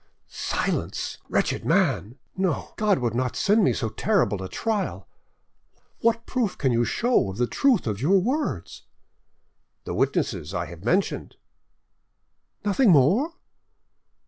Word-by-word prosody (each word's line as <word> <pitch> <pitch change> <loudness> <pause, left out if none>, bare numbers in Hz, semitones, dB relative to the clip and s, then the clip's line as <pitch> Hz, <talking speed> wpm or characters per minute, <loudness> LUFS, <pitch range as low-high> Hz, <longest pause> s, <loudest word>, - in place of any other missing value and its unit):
"Silence, - - -2
wretched - - 0
man!... 110 +9 +1 0.2
No, 185 -5 -1
God 210 -3 +2
would 120 -3 -1
not 125 +1 -1
send 210 +2 +3
me - - +4
so 110 - -2
terrible 110 - +1
a 95 - -6
trial. 190 - -2 0.9
What 230 0 +1
proof 240 -7 -1
can 130 -3 +1
you 120 0 +2
show 235 - +1
of 95 - -7
the 125 - +2
truth 255 - +2
of 105 -2 -3
your 185 +8 +4
words?" 195 - -2 1.0
"The - - -5
witnesses 85 +6 -1
I 85 - -1
have 85 +2 -11
mentioned." 185 - 0 1.3
"Nothing 210 +4 +3
more?" 190 - +4
165 Hz, 130 wpm, -25 LUFS, -, 1.3 s, me